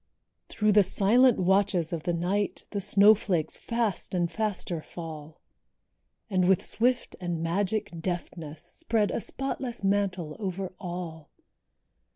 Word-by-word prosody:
Through 215 -1 +2
the 205 0 +7
silent 220 +6 +4
watches 185 -2 +2
of 165 - -2
the 175 - -1
night 190 +4 -1
The 200 - -2
snowflakes 200 -5 +4
fast 230 -5 -2
and 175 -1 0
faster 195 -6 -2
fall; 155 -2 -9 0.9
And 185 -4 +2
with 190 - +3
swift 245 +3 0
and 175 -2 -2
magic 195 +5 0
deftness, 165 -3 -5
Spread 210 +4 -1
a - - -2
spotless 260 -3 -4
mantle 195 -5 0
over 190 -2 -4
all. 170 -4 -6
190 Hz, 125 wpm, -28 LUFS, 170-210 Hz, 0.9 s, the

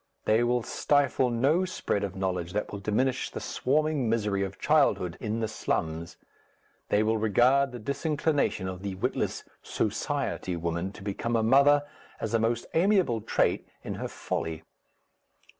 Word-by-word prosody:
They 110 +2 +3
will 120 0 +1
stifle 140 -2 +2
no 135 +10 +2
spread 180 - -2
of 100 -1 -4
knowledge 90 -2 -2
that 105 - -2
will 100 - -5
diminish 110 +6 0
the - - -6
swarming 145 -2 0
misery 105 -3 0
of 95 0 -3
childhood 90 -2 +2
in 110 +1 -2
the 110 - 0
slums, 85 -5 -3 0.7
they 105 - +3
will 110 0 +1
regard 125 +6 +3
the 125 - -6
disinclination 140 - 0
of 90 -1 -6
the 100 -1 -4
witless 95 - -2 0.2
"Society" 90 - -2
woman 85 +2 -2
to 100 - -11
become 105 +4 -2
a 115 - +2
mother 140 +5 +5 0.4
as 110 0 -3
a 115 - +3
most 115 +1 0
amiable 175 - +3
trait - - +1 0.2
in - - -4
her - - -2
folly. 80 0 -4
110 Hz, 155 wpm, -28 LUFS, 95-135 Hz, 0.7 s, mother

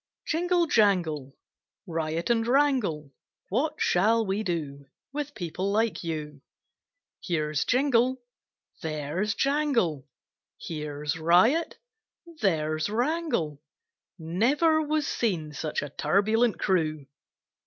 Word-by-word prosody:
JINGLE, 350 +2 +1
jangle! 175 - +1 0.5
Riot 165 +2 -2
and 230 -1 +1
wrangle! 245 - +1 0.4
What 295 +9 0
shall 220 +5 +3
we 195 +2 -1
do 150 -7 -4 0.3
With 290 0 -4
people 180 +2 -3
like 220 0 0
you? 150 -4 -5 0.8
Here's 155 -4 0
Jingle! 255 -1 +2 0.6
There's 160 +7 -2
Jangle! 260 - +1 0.5
Here's 150 0 -4
Riot! 185 - +3 0.6
There's 155 -4 0
Wrangle! 240 - -1 0.6
Never 260 - +2
was 305 -1 0
seen 170 - -1
such 150 +1 -3
a 145 - -5
turbulent 220 - +2
crew! 155 -6 0
190 Hz, 95 wpm, -27 LUFS, 155-250 Hz, 0.8 s, shall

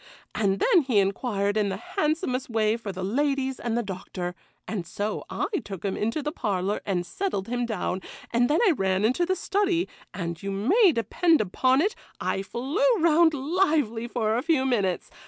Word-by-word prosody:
And 195 -2 +1
then 360 - +5
he 255 -6 0
inquired 200 +1 +1
in 210 -2 +2
the 190 - -3
handsomest 300 - -1
way 220 -1 +2
for 225 -3 -5
the 185 0 -6
ladies 265 +4 0
and 235 -1 -1
the 240 - 0
Doctor, 185 -2 -5 0.3
and 185 -6 -4
so 205 +4 -3
I - - -1 0.2
took 195 -1 -7
him 195 - -1
into 230 +8 -1
the 300 - -2
parlour 200 - -1
and 180 -3 0
settled 280 - -3
him 245 0 -1
down, 190 -4 -2 0.3
and 245 +1 +3
then 305 - +3
I - - +6
ran 190 - +1
into 260 +10 +2
the 375 - +1
study, 380 -2 0 0.2
and 170 -3 -5
you 200 - -4
may 330 - +4
depend 315 - +2
upon 255 +7 +2
it 405 +5 +1 0.3
I 195 - -1
flew 260 - -3 0.2
round 325 -1 +4
lively 285 - +1
for 225 -3 0
a 240 - +1
few 305 -4 +2
minutes. 200 -9 0
235 Hz, 185 wpm, -26 LUFS, 200-300 Hz, 0.3 s, I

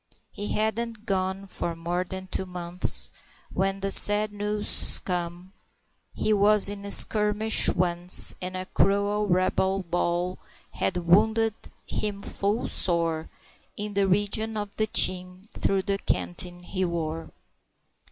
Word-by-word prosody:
He 205 - -8
hadn't 220 +1 -4
gone 190 -1 -3
for 170 -3 -6
more 175 +2 -4
than 190 +1 -9
two 190 0 -5
months 180 0 +1 0.4
When 195 0 -3
the 195 0 -2
sad 205 +1 +6
news 210 0 +3
come 175 +1 -5 0.6
"he 215 - -1
was 205 0 +6
in 205 0 -8
a - - -7
skirmish 210 +1 +4
once, 175 0 +3
And 185 0 -6
a 185 - -6
cruel 200 +2 -1
rebel 190 +1 -1
ball 175 +1 -3 0.3
had 185 - -3
wounded 220 +6 +1 0.3
him 205 -1 -5
full 205 +4 -3
sore 165 -3 -1 0.5
In 210 0 -6
the 200 -1 0
region 205 +3 -1
of 205 -1 -7
the 215 - -1
chin, 185 -2 +2
through 195 -1 -1
the 195 0 -3
canteen 175 -1 -4
he 185 +1 -5
wore." 165 -2 -5
195 Hz, 135 wpm, -24 LUFS, 180-205 Hz, 0.6 s, sad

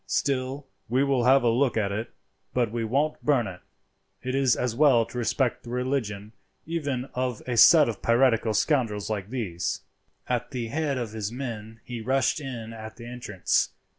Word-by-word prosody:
"Still, 135 +1 -1 0.2
we 130 +3 +3
will 135 -4 +1
have 135 +1 +5
a 120 - +4
look 125 +1 +2
at 100 -2 +1
it, 110 +3 -3 0.5
but 120 -4 +1
we 115 0 -2
won't 140 +7 0
burn 140 -6 +3
it; 90 -2 -7 0.6
it 130 - -2
is 135 -3 +3
as 125 -2 -1
well 130 -5 +5
to 120 - -9
respect 120 +1 0
the 120 - -11
religion, 120 -5 -2 0.3
even 145 -6 -2
of 125 -2 -2
a 125 - -2
set 150 +6 +8
of 115 -3 -4
piratical 115 -2 +3
scoundrels 110 -6 +1
like 100 -2 -3
these." 100 -10 -3 0.5
At 125 -1 -1
the 120 -4 -4
head 145 0 -1
of 120 -4 -3
his 110 -1 -4
men 115 -3 -6
he 120 -2 -6
rushed 130 +5 +1
in 120 -6 -6
at 110 -1 -9
the 115 - -10
entrance. 120 -6 -1
120 Hz, 180 wpm, -26 LUFS, 110-135 Hz, 0.6 s, set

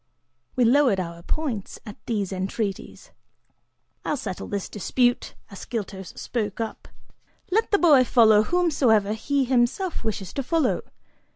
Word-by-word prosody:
We 250 - +3
lowered 250 -4 +4
our 170 -2 -5
points 245 - -3
at 210 -1 -8
these 205 -5 -1
entreaties. 195 +2 -4 0.9
"I'll 300 - -1
settle 195 -7 -5
this 200 -2 -3
dispute," 245 +4 0 0.2
Ascyltos 200 -2 -6
spoke 215 -4 -3
up, 225 -1 -5 0.6
"let 440 +4 +2
the 405 - +4
boy 300 -8 +6
follow 220 -4 +5
whomsoever 245 - +2
he 280 +5 0
himself 255 +9 0
wishes 200 -4 -4
to 275 - -2
follow. 300 -1 +1
230 Hz, 125 wpm, -24 LUFS, 200-275 Hz, 0.9 s, boy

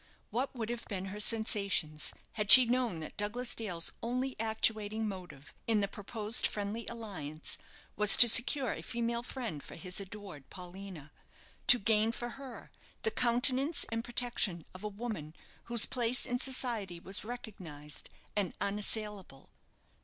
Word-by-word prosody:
What 255 +5 -2
would 225 -2 -4
have 240 0 -5
been 190 -3 -4
her 210 - -6
sensations 200 -8 +2 0.2
had 210 -2 -3
she 255 -1 +12
known 235 -8 0
that 155 - -8
Douglas 235 +5 -2
Dale's 180 -7 -2
only 255 +3 -2
actuating 220 -1 +1
motive 180 -8 -9
in 225 -2 +3
the 200 - +1
proposed 210 +3 -2
friendly 210 +2 -4
alliance, 170 -10 -3 0.4
was 210 -1 +8
to 240 - +10
secure 245 +2 +4
a 160 - -7
female 235 +5 -2
friend 240 - -5
for - - -10
his 180 +3 -3
adored 195 -7 -9
Paulina, 180 -4 -10 0.6
to 245 - +10
gain 220 +1 +2
for 240 +1 -5
her 265 -1 -10 0.3
the 450 - +1
countenance 255 - +2
and 230 0 -2
protection 235 -8 0
of 185 +2 -11
a - - -2
woman 205 -8 -6 0.3
whose 235 -2 +3
place 245 0 -1
in 245 0 -2
society 235 -9 0
was 190 +2 -3
recognized 180 -11 -7 0.3
and 200 -4 -1
unassailable? 205 -6 -2
215 Hz, 145 wpm, -32 LUFS, 190-240 Hz, 0.6 s, she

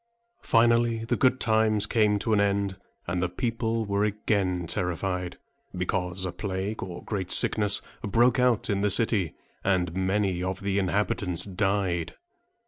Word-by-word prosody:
Finally 115 0 +2
the 120 +1 0
good 130 +1 +2
times 110 -2 +3
came 105 -3 +2
to 110 +2 -1
an 105 - +3
end; 100 -1 0 0.3
and 90 0 -2
the 90 - 0
people 115 +2 -2
were 100 0 0
again 100 -4 0
terrified, 90 +1 -2 0.4
because 90 0 -1
a 90 - -3
plague, 95 +3 -4
or 90 -1 -7
great 95 -4 -4
sickness, 105 -2 +3 0.2
broke 120 +5 +3
out 125 -3 +2
in 100 -1 0
the 105 - +2
city, 100 -4 +1 0.3
and 90 -3 +1
many 95 -1 0
of 95 +1 -3
the 100 0 0
inhabitants 95 -2 0
died. 95 -3 -1
100 Hz, 145 wpm, -26 LUFS, 90-110 Hz, 0.4 s, times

